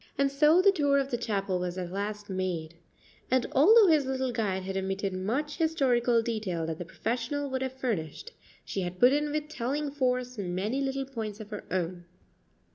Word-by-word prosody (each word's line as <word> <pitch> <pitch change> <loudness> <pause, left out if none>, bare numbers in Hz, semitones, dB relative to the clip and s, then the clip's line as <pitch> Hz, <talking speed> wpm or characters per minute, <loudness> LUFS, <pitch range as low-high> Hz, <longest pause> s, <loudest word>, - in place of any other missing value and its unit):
And 275 0 +2
so 305 +6 +5
the 395 - +7
tour 285 -6 +2
of 275 0 0
the - - +1
chapel 195 -5 -1
was 180 0 -3
at 180 -1 -4
last 205 +1 -4
made; 180 -4 -3 0.6
and 255 -1 +2
although 420 - +7
his 310 -6 +4
little 260 -1 -1
guide 200 -5 -1
had 190 +1 -4
omitted 195 0 -2
much 250 +11 -2
historical 250 -8 +2
detail 210 -8 -2
that 160 -1 -4
the 175 - -5
professional 250 - -3
would 260 0 -1
have 260 -1 -2
furnished, 240 - -3 0.3
she 195 - -3
had 180 0 -4
put 250 +2 +6
in 295 0 0
with 300 0 -2
telling 285 +1 -2
force 250 -3 -1
many 200 +8 -2
little 270 0 -1
points 220 -5 -5
of 215 0 -9
her 210 - -6
own. 175 -1 -2
240 Hz, 190 wpm, -29 LUFS, 190-275 Hz, 0.6 s, the